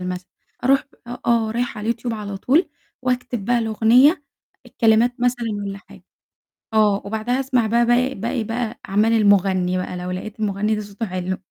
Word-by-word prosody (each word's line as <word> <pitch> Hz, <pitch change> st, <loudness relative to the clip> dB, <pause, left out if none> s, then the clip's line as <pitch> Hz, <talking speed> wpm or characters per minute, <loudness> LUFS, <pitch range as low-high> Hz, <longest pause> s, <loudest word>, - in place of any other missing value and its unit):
مثلًا، 180 Hz, 0 st, -5 dB, 0.4 s
أروح 270 Hz, +2 st, +3 dB, 0.4 s
آه، 230 Hz, -2 st, +2 dB
رايحة 240 Hz, 0 st, -2 dB
على 210 Hz, -, -6 dB
اليوتيوب 235 Hz, 0 st, -2 dB
على 205 Hz, -2 st, -5 dB
طول 280 Hz, -, +2 dB, 0.3 s
وأكتب 250 Hz, -4 st, -2 dB
بقى 245 Hz, +3 st, +2 dB
الأغنية، 235 Hz, -, +4 dB, 0.4 s
الكلمات 230 Hz, +1 st, +3 dB
مثلًا 245 Hz, -1 st, 0 dB
والّا 200 Hz, -1 st, -4 dB
حاجة. -, -, -17 dB, 0.7 s
آه، 210 Hz, -2 st, +3 dB
وبعدها 220 Hz, +5 st, -1 dB
أسمع 255 Hz, -4 st, +1 dB
بقى 235 Hz, +2 st, +2 dB
باقي 250 Hz, +2 st, +2 dB
باقي 230 Hz, +1 st, -2 dB
بقى 225 Hz, 0 st, -4 dB
أعمال 210 Hz, +4 st, +2 dB
المُغنّي 195 Hz, -4 st, +3 dB
بقى، 185 Hz, 0 st, -4 dB
لو 180 Hz, 0 st, -5 dB
لقيت 200 Hz, +4 st, -6 dB
المُغنّي 210 Hz, +1 st, 0 dB
ده 210 Hz, -, -3 dB
صوته 205 Hz, +2 st, -6 dB
حلو. 185 Hz, 0 st, -3 dB
220 Hz, 160 wpm, -21 LUFS, 200-240 Hz, 0.7 s, الأغنية